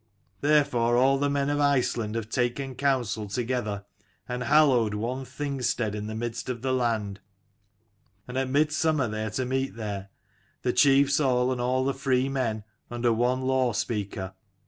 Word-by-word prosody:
Therefore 125 -5 +3
all 135 +2 +4
the 145 0 +1
men 140 -1 0
of 145 - 0
Iceland 125 -6 +1
have 115 -2 -3
taken 125 +3 -1
counsel 125 -6 0
together, 110 -2 -2 0.4
and 125 0 -4
hallowed 130 -7 +4
one 125 +5 -3
Thing 140 +1 -4
stead 110 -3 0
in 105 0 -4
the 110 - -5
midst 120 +2 -4
of 120 -1 -4
the 130 -1 0
land; 110 -5 -1 1.1
and 125 - -7
at 130 0 0
mid 150 +3 +2
summer 155 -4 +1
they 110 0 -3
are - - -2
to 125 +5 -2
meet 130 0 -2
there, 100 -3 -5 0.5
the 125 - +1
chiefs 140 0 +4
all 125 -3 +2
and 125 -1 -2
all 130 +1 +1
the 140 - +1
free 135 -1 +1
men, 115 -6 -1 0.3
under 120 -1 +1
one 125 +3 +1
law 130 -2 +1
speaker. 100 -3 -3
125 Hz, 170 wpm, -27 LUFS, 115-135 Hz, 1.1 s, all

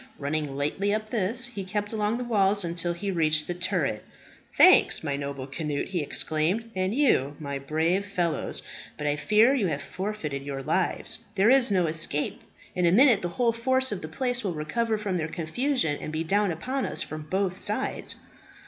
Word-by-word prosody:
Running 145 -1 -2
lightly 195 +9 0
up 215 0 -5
this, 230 +3 +1
he 235 -6 -6
kept 205 +3 -3
along 215 +1 0
the 250 - -3
wall 205 -4 +2
until 170 0 -2
he 195 +3 -3
reached 155 -3 +1
the 175 - -3
turret. 175 - -1 0.5
"Thanks, - - +6
my 145 -3 -1
noble 140 -1 -5
Cnut!" 145 +2 -3
he 180 -3 -1
exclaimed, 165 +10 -1
"and 185 +3 -1
you, 145 - +2
my 140 -2 -4
brave 160 +7 0
fellows. 180 -5 -2 0.3
But 150 - -5
I 145 0 +1
fear 210 - +4
you 235 -9 +1
have 145 -3 -3
forfeited 185 -8 -4
your 135 -1 -5
lives. 175 +5 0
There 205 +4 +4
is 265 -3 +5
no 185 -3 +2
escape. 155 -2 -1 0.3
In 180 -1 +1
a - - +4
minute 235 +1 +6
the 175 - -2
whole 235 -2 +3
force 260 +2 +1
of 205 - -4
the 155 - -5
place 245 +8 -2
will 185 -5 -2
recover 220 +9 -1
from 200 -3 -2
their 155 -2 -2
confusion, 170 - -1
and - - -5
be 155 +1 -2
down 200 +4 +2
upon 255 - -2
us 150 +1 -2
from 155 0 -7
both 190 -1 -1
sides." 210 +6 +2
185 Hz, 190 wpm, -26 LUFS, 155-215 Hz, 0.5 s, Thanks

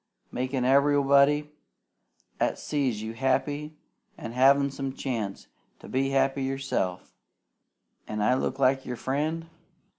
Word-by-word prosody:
Makin' 130 0 -2
everybody, 140 +2 +4 0.9
at - - +1
sees 130 -8 -2
you 110 +1 -5
happy, 145 +4 -1 0.4
an' 115 - -7
havin' 140 +3 +4
some 135 -1 -4
chance 115 -8 -4 0.3
to - - -12
be 135 +1 0
happy 135 0 +1
yourself. 130 -9 -2 0.9
An' 105 - -4
I 105 +4 +3
look 130 - -1
like 135 0 +2
your 125 -1 -5
friend? 155 +6 -2
135 Hz, 120 wpm, -27 LUFS, 125-140 Hz, 0.9 s, everybody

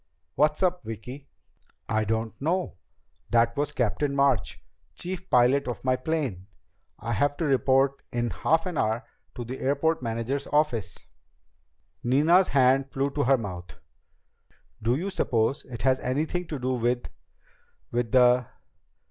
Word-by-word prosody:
"What's 150 +5 +2
up, 180 -3 +1
Vicki?" 115 +6 -8 0.6
"I 110 -1 0
don't 110 +1 -1
know. 170 - -1 0.5
That 115 0 +3
was 145 0 0
Captain 140 +2 -1
March, 140 -3 +1 0.4
chief 185 +1 -6
pilot 130 +3 +4
of 120 +1 -5
my 130 0 +3
plane. 130 - -3 0.5
I 115 +2 -5
have 145 +5 +1
to 165 - -1
report 135 0 +2
in 120 -1 -1
half 160 - +1
an 180 -5 -3
hour 110 +3 0 0.3
to 120 - -5
the 130 +3 -6
airport 145 +4 +1
manager's 115 +4 -2
office." 145 -8 0 1.0
Nina's 155 +9 +4
hand 135 0 +3
flew 135 +1 -1
to 145 -1 -1
her 135 +1 +4
mouth. 90 -6 -7 1.0
"Do 115 +3 +2
you 185 +7 -3
suppose 120 -6 0
it 120 -4 -8
has 130 0 +3
anything 155 +7 -2
to 150 - -4
do 130 0 -1
with... 120 0 0 0.8
with 120 -2 -1
the 125 -1 +5
130 Hz, 140 wpm, -26 LUFS, 120-145 Hz, 1.0 s, the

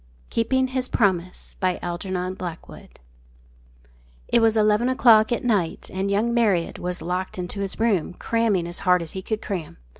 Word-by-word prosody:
KEEPING 260 +3 +1
HIS 255 -1 -2
PROMISE 185 -4 -1
It 180 -1 -4 1.5
was 225 -1 +3
eleven 215 +3 +3
o'clock 235 -4 +5
at 240 - -1
night, 200 -9 0
and 190 +1 -1
young 215 +4 +1
Marriott 205 -8 +1
was 180 0 -3
locked 180 +2 -3
into 180 +2 -5
his 195 -1 -4
room, 200 -7 +1
cramming 225 -6 0
as 175 - -4
hard 180 -1 +3
as 160 - -8
he 190 - -5
could 215 +3 -4
cram. 180 -7 -5
195 Hz, 145 wpm, -23 LUFS, 180-225 Hz, 1.5 s, o'clock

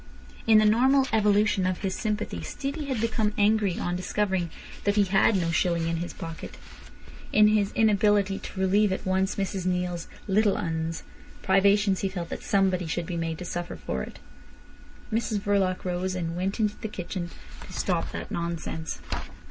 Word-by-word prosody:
In 220 -1 +7
the 215 - +5
normal 260 +5 +4
evolution 210 -3 +3
of 185 -1 0
his 190 -2 -1
sympathy 215 +1 -2
Stevie 290 +2 -4
had 260 -4 -1
become 220 -2 0
angry 205 -3 +3
on 175 - -1
discovering 185 -1 -1 0.3
that 205 0 +2
he 205 - +5
had 195 +3 +3
no 170 -3 +1
shilling 170 0 +1
in 165 0 0
his 175 +1 -4
pocket. 165 -1 -8 0.7
In 210 0 +6
his 210 -2 +2
inability 205 -2 +3
to 190 - -8
relieve 200 +2 +3
at 190 - -3
once 190 +1 +1
Mrs 190 -2 -2
Neale's 180 -2 -1 0.2
"little 205 +1 +3
'uns'" 160 -1 -2 0.4
privations, 195 0 +4
he 195 - 0
felt 175 -3 -5
that - - -5
somebody 190 -3 +1
should 170 +2 -2
be 175 - -4
made 165 -1 -2
to 180 - -7
suffer 175 - -4
for 70 -4 -4
it. - - -7 1.0
Mrs 220 -1 0
Verloc 195 -3 0
rose, 185 +1 -1
and 165 -2 -3
went 190 +5 -2
into 210 -1 +1
the 220 - -4
kitchen 180 -3 -5 0.4
to - - -12
"stop - - -1
that - - -6
nonsense." 170 -1 -4
190 Hz, 170 wpm, -27 LUFS, 175-210 Hz, 1.0 s, In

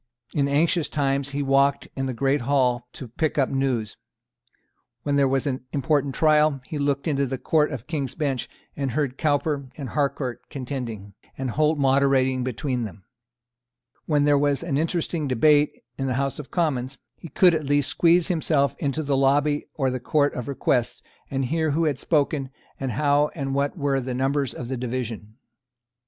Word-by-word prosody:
In 140 -1 +1
anxious 160 +4 +2
times 140 -1 0
he 140 +1 -2
walked 140 +1 +2
in 135 0 -2
the - - -2
great 135 +3 +1
Hall 125 -2 +1
to 130 - -8
pick 150 +8 -2
up 135 -2 +2
news. 130 -6 -1 1.1
When 145 -1 0
there 140 -1 +4
was 135 +1 0
an 130 -3 -2
important 145 -1 0
trial, 155 -2 +3
he 150 - -5
looked 140 +1 0
into 140 -3 +1
the 135 +1 -3
Court 150 +3 +1
of 130 -4 -6
King's 140 -5 -3
Bench, 140 -6 -2 0.3
and 135 -4 -2
heard 135 -2 -1
Cowper 145 -2 0
and 140 -4 -5
Harcourt 135 -4 -2
contending, 120 -7 -6 0.2
and 130 -2 -2
Holt 155 +4 +2
moderating 135 -2 +3
between 125 +1 -2
them. 105 -2 -8 1.0
When 150 -2 +3
there 145 -1 +4
was 145 +1 +1
an 165 -5 -2
interesting 160 0 -1
debate, 145 +4 +3 0.2
in 135 - -1
the 130 - 0
House 135 +1 -1
of 145 - -8
Commons, 135 -6 -1 0.2
he - - -10
could 180 +2 +4
at 155 -2 -1
least 145 0 +2
squeeze 170 0 +3
himself 155 -6 +1
into 145 +2 -1
the 140 -1 0
lobby 145 +2 +2
or 135 -3 0
the 130 - -3
Court 145 +3 +1
of 125 - -5
Requests, 130 -3 0 0.3
and 135 -1 -1
hear 160 +4 0
who 165 - +2
had 145 -5 0
spoken, 145 -3 0 0.3
and 130 -3 -2
how 145 +3 +3
and 135 -4 -3
what 140 +4 -1
were 140 -3 0
the 125 0 -4
numbers 135 0 0
on 125 - -5
the 130 +2 -4
division. 115 -4 -4
140 Hz, 180 wpm, -24 LUFS, 130-150 Hz, 1.1 s, there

